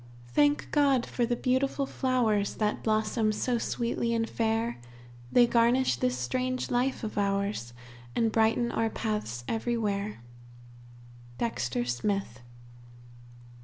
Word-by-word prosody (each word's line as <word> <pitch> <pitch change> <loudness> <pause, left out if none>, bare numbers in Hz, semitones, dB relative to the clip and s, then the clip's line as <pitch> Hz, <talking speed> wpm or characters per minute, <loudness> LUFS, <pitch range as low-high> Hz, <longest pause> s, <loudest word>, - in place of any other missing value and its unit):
"Thank 290 - +2
God 275 -4 +3
for 240 -2 -1
the 240 - +1
beautiful 265 +3 0
flowers, 235 -7 0
That 210 -1 -1
blossom 215 0 +1
so 235 +3 0
sweetly 235 0 -1
and 225 0 0
fair; 225 - -1 0.5
They 245 - +6
garnish 235 - +3
this 125 0 0
strange 255 - -2
life 250 +1 0
of 215 -1 -3
ours, 200 - -1 0.4
And 225 -1 +2
brighten 225 +2 +2
our 225 0 0
paths 210 - -3
everywhere." 215 - -2 1.1
_Dexter 120 - -1
Smith. 130 - -2
225 Hz, 115 wpm, -29 LUFS, 205-245 Hz, 1.1 s, They